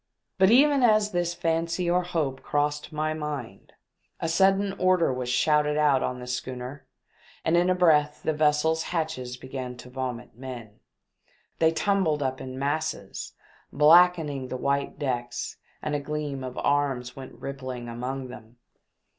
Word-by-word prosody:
But 190 0 +6
even 280 +4 +5
as 215 -3 +4
this 175 -1 -1
fancy 165 +1 -1
or 175 +1 +3
hope 155 -7 -2
crossed 150 +2 -1
my 155 0 -1
mind, 145 -10 -6 0.5
a - - -2
sudden 195 +3 +3
order 185 -6 +3
was 125 -1 -3
shouted 150 +3 +2
out 145 -3 +4
on 125 - -2
the 125 - -7
schooner 125 +2 -5 0.6
and 160 - +3
in 175 +1 +3
a 185 - +3
breath 150 -4 +3
the 160 - +1
vessel's 155 +1 +2
hatches 155 -8 -3
began 130 -1 -6
to 125 0 -12
vomit 125 -2 -5
men. 120 -4 -9 0.8
They 160 0 +4
tumbled 165 -4 +1
up 130 0 -2
in 130 0 -7
masses, 145 +3 -3 0.4
blackening 155 -3 +5
the 130 - -4
white 140 +2 -1
decks, 125 -4 -3 0.3
and 150 - -2
a 145 - +1
gleam 145 -2 -4
of 130 -1 -6
arms 135 -4 0
went 135 -1 -9
rippling 130 -3 -6
among 125 +3 -4
them. 115 -1 -12
145 Hz, 150 wpm, -26 LUFS, 130-165 Hz, 0.8 s, But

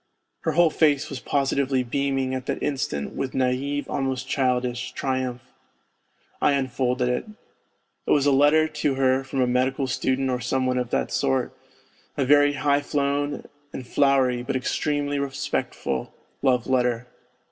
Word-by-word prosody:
Her 160 - -1
whole 170 0 +4
face 150 -3 +2
was 135 - -4
positively 135 -1 0
beaming 135 +1 -1
at 130 0 -4
that - - -2
instant 130 - -2
with 135 -1 -4
naive, 130 +3 0
almost 135 -2 -2
childish, 125 -2 -1
triumph. 130 -2 -2 1.0
I - - +4
unfolded 130 -2 0
it. 125 0 -1 0.8
It - - -3
was 145 -1 +4
a 145 - +4
letter 145 +3 +4
to 150 -3 -1
her 130 0 +2
from 135 0 -2
a - - +4
medical 130 +2 +1
student 130 +1 0
or 125 - -1
some 130 +2 -1
one 125 0 +1
of 125 -1 -3
that - - -1
sort 65 0 0 0.6
a 135 - +1
very 145 +1 +5
high 145 +1 +1
flown 145 0 -1 0.3
and 130 - -6
flowery, 130 -2 +2
but 125 - -3
extremely 145 +2 -1
respectful, 135 - -3 0.3
love 125 -3 +2
letter. 125 -2 +1
135 Hz, 150 wpm, -24 LUFS, 125-140 Hz, 1.0 s, very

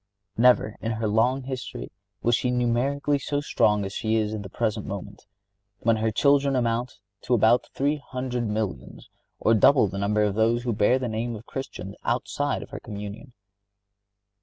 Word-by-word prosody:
Never, 120 -2 +4
in 115 0 -1
her 110 0 -2
long 125 +5 +2
history, 130 -1 -6 0.3
was 120 0 +4
she 125 - 0
numerically 125 +4 +1
so 145 +1 -2
strong 105 -8 +2
as 95 - -6
she 110 +1 0
is 110 -1 0
at 110 - -4
the 100 - -8
present 110 0 -2
moment, 100 +1 -7 0.5
when 115 -1 +3
her 110 +1 +1
children 140 +4 +3
amount 120 0 -1 0.2
to 125 - +1
about 115 +2 +3
three 145 +2 +1
hundred 125 -4 -4
millions, 105 - -4 0.3
or 115 - +3
double 130 +1 +5
the 100 +1 -5
number 105 +1 +1
of 105 -1 +1
those 115 +3 +2
who 120 -2 -1
bear 105 +4 +3
the 130 -1 -3
name 115 +1 -3
of 110 +2 -10
Christians 115 -9 -6
outside 130 +4 -1
of - - -14
her - - -6
communion. 105 +4 -8
115 Hz, 175 wpm, -25 LUFS, 105-125 Hz, 0.5 s, double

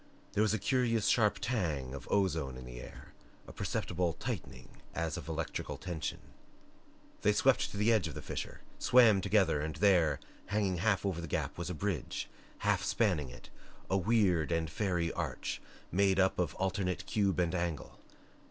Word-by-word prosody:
There 105 - +2
was 110 -2 +3
a - - +1
curious 115 -1 +1
sharp 105 -3 +3
tang 85 - -1
of 70 -3 -8
ozone 80 -10 +1
in 65 - -9
the - - -8
air, - - -12 0.3
a - - -10
perceptible 90 -1 -1
tightening 65 -4 -6
as 85 -2 -1
of - - -7
electrical 80 0 -3
tension. 85 -5 -4 1.0
They - - +4
swept - - +3
to - - -7
the 110 +3 +4
edge 105 -7 +2
of 75 - -7
the - - -5
fissure, - - -5 0.2
swam 115 -6 +6
together, 95 -7 +3
and 80 0 -3
there, 85 -5 +4 0.3
hanging 100 -3 0
half 100 +2 +1
over 90 -4 -1
the 85 - -5
gap - - -2
was 85 +1 -4
a 90 - -3
bridge, 95 -3 -2 0.4
half - - +3
spanning 90 - +1
it, 65 - -13 0.4
a 95 - +4
weird 95 -6 +2
and 80 -2 0
fairy 85 -2 0
arch - - -3 0.3
made 95 +1 +3
up 95 -1 +3
of 85 -5 0
alternate 95 -1 -1
cube 100 -5 +1
and 85 -1 +1
angle. 85 -4 -3
90 Hz, 170 wpm, -33 LUFS, 80-100 Hz, 1.0 s, swam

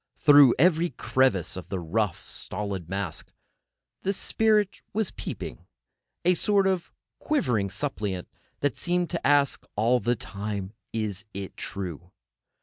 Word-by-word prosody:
Through 145 -4 +7
every 170 +2 +4
crevice 130 - +1
of 95 - -8
the 95 - -2
rough, 95 +3 -1
stolid 95 -4 -4
mask 95 -4 -4 0.7
the 195 - 0
spirit 210 -1 +1
was 215 -3 0
peeping, - - -7 0.6
a 180 - +6
sort 200 +2 +2
of 190 -3 0 0.3
quivering 120 - +1
suppliant, 105 -8 -3 0.3
that 145 -4 +1
seemed 175 0 0
to 170 -6 -1
ask 145 -1 +3
all 115 +4 +3
the 120 +3 +1
time: 100 -1 -5 0.2
"Is 105 -2 -3
it 100 -1 -6
true?" 90 -3 -5
115 Hz, 130 wpm, -27 LUFS, -, 0.7 s, Through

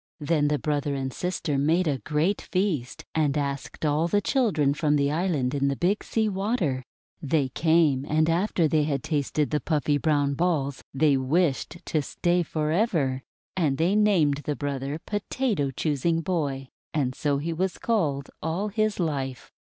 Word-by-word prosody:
Then 150 -1 +1
the 150 0 +1
brother 145 -1 -1
and 135 -1 -3
sister 170 -5 -2
made 165 +5 +2
a 140 -3 0
great 155 +9 0
feast, 180 -10 -2
and 150 -3 +1
asked 140 +1 -3
all 150 +3 +2
the 205 +4 +2
children 195 - +2
from 150 0 +1
the 140 0 +2
island 155 -6 0
in 140 -1 +1
the 140 - 0
Big 185 +8 0
Sea 220 -1 0
Water. 190 - -1 0.4
They 145 -2 +1
came, 160 -2 +3
and 155 +1 +3
after 170 0 +2
they 155 -1 +2
had 140 -4 -1
tasted 150 -1 -1
the 150 - +1
puffy 150 0 0
brown 145 -2 +1
balls, 140 -3 -1
they 140 0 +3
wished 145 +4 0
to 155 - 0
stay 175 +5 0
for 155 -2 -2
ever. 160 - +1 0.3
And 150 -7 +1
they 175 +5 +2
named 185 -10 +3
the 150 - -1
brother 140 0 -3
"Potato 205 - -1
Choos 140 +1 -2
ing 165 -1 +2
Boy," 145 -7 -2 0.3
and 130 -4 +1
so 145 +1 0
he 165 +4 -2
was 185 +3 -1
called 150 -12 -1
all 175 +7 -1
his 215 -1 0
life. 135 -6 -3
150 Hz, 170 wpm, -26 LUFS, 140-175 Hz, 0.4 s, came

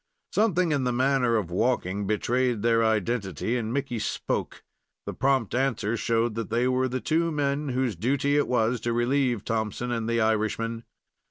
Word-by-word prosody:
Something 185 -6 +2
in 140 -3 +1
the 125 - +1
manner 125 -1 +2
of 100 -6 -1
walking 100 -1 0
betrayed 120 +2 0
their 115 -1 +3
identity, 110 - 0
and 115 -2 -2
Mickey 135 -3 -2
spoke. - - -3 0.4
The - - -4
prompt 130 -3 +1
answer 120 -4 0
showed 115 0 0
that 115 +1 -4
they 120 +3 +1
were 130 0 +1
the 130 +1 -2
two 165 +5 0
men 145 -1 -1
whose 125 -4 0
duty 140 - +1
it 145 - +2
was 120 0 +1
to 120 - -1
relieve 120 -2 +1
Thompson 110 +2 -2
and 115 -1 -2
the 115 0 +1
Irishman. 110 +1 0
120 Hz, 170 wpm, -26 LUFS, 110-130 Hz, 0.4 s, their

